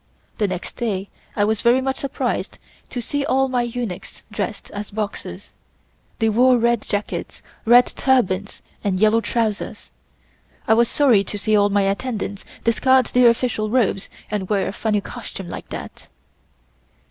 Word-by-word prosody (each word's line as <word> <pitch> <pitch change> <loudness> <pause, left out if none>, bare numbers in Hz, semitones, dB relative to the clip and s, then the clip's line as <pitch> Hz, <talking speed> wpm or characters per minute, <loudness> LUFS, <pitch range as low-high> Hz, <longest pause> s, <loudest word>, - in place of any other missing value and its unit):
The 210 - +2
next 185 -2 -5
day 200 -5 -2 0.3
I 205 - +3
was 220 0 +1
very 240 +2 +4
much 265 0 -1
surprised 275 -1 -2 0.3
to 245 - -4
see 285 +4 -2
all 270 -2 +2
my 250 -1 +1
eunuchs 240 -6 -5
dressed - - -4
as 205 0 -6
Boxers. 210 0 -5 0.6
They 225 - +1
wore 250 +3 +5
red 235 -1 +2
jackets, 205 0 -4 0.2
red 245 +2 +7
turbans 205 -7 0 0.2
and 190 -2 0
yellow 215 +2 +4
trousers. 225 -3 -2 0.8
I - - +6
was 235 +1 +4
sorry 245 -9 +4
to 205 - -4
see 215 +1 +1
all 205 0 +4
my 200 0 +2
attendants 200 0 -2 0.2
discard 260 +3 +4
their 245 -1 +7
official 230 -3 0
robes 215 -5 +1 0.2
and 200 -3 -2
wear 200 -2 +1
a - - -4
funny 210 -1 0
costume 200 -5 -8
like - - -7
that. - - -8
220 Hz, 155 wpm, -21 LUFS, 205-245 Hz, 0.8 s, red